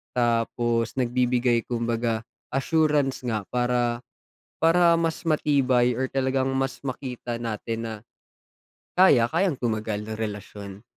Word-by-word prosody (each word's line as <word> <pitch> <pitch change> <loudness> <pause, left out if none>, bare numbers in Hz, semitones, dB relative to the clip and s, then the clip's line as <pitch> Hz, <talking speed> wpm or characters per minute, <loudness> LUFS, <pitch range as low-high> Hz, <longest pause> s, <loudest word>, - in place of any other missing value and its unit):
Tapos 115 -1 0
nagbibigay 125 -1 +1
kumbaga 115 -1 -1 0.3
assurance 145 -2 +1
nga, 110 -3 -1
para 120 -1 +1 0.6
para 170 +1 +4
mas 165 -1 -1
matibay 135 -6 +2
or 130 +2 -2
talagang 130 0 0
mas 135 0 -1
makita 125 -3 -5
natin 115 0 -4
na 110 - -5 1.1
kaya, 125 -11 +6
kayang 175 0 +1
tumagal 110 -3 -2
ng 110 0 -6
relasyon. 105 -2 -6
120 Hz, 110 wpm, -25 LUFS, 115-135 Hz, 1.1 s, kaya